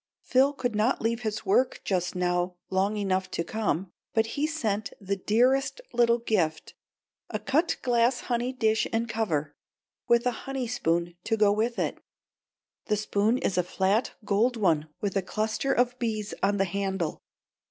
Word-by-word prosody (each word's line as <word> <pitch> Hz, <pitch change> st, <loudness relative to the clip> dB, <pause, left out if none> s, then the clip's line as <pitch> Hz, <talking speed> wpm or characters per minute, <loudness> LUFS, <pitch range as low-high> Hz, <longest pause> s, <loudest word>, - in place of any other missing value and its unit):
Phil 265 Hz, +2 st, +4 dB
could 245 Hz, -4 st, -2 dB
not 215 Hz, +5 st, +2 dB
leave 230 Hz, +1 st, -1 dB
his 215 Hz, -1 st, -3 dB
work 245 Hz, +7 st, +2 dB
just 180 Hz, -2 st, -1 dB
now 180 Hz, 0 st, 0 dB, 0.2 s
long 195 Hz, +3 st, +1 dB
enough 190 Hz, -2 st, 0 dB
to 170 Hz, -, -2 dB
come, 195 Hz, -3 st, -2 dB, 0.2 s
but 225 Hz, 0 st, +4 dB
he 295 Hz, +2 st, 0 dB
sent 220 Hz, -10 st, -2 dB
the 200 Hz, 0 st, -2 dB
dearest 250 Hz, -, +2 dB
little 235 Hz, -1 st, +4 dB
gift 180 Hz, -9 st, -1 dB, 0.6 s
a -, -, -2 dB
cut 315 Hz, +5 st, +1 dB
glass 240 Hz, 0 st, +2 dB
honey 245 Hz, +1 st, -1 dB
dish 220 Hz, -4 st, +1 dB
and 230 Hz, +1 st, 0 dB
cover, 165 Hz, -11 st, -1 dB, 0.5 s
with 235 Hz, +1 st, +4 dB
a 250 Hz, -, +3 dB, 0.2 s
honey 270 Hz, -2 st, -2 dB
spoon 175 Hz, -7 st, -1 dB
to 225 Hz, -, 0 dB
go 210 Hz, -1 st, +5 dB
with 225 Hz, +3 st, 0 dB
it. -, -, -1 dB, 0.9 s
The 210 Hz, -, +2 dB
spoon 210 Hz, +3 st, +1 dB
is 185 Hz, -7 st, 0 dB
a -, -, +3 dB
flat 190 Hz, +5 st, 0 dB
gold 230 Hz, +5 st, +2 dB
one 160 Hz, -7 st, +2 dB
with 200 Hz, -2 st, -2 dB
a 195 Hz, -, +2 dB
cluster 220 Hz, +7 st, -1 dB
of 245 Hz, +1 st, +1 dB
bees 215 Hz, -3 st, -2 dB
on 200 Hz, +1 st, +2 dB
the 195 Hz, -, +2 dB
handle. 190 Hz, -3 st, -2 dB
215 Hz, 165 wpm, -27 LUFS, 190-240 Hz, 0.9 s, go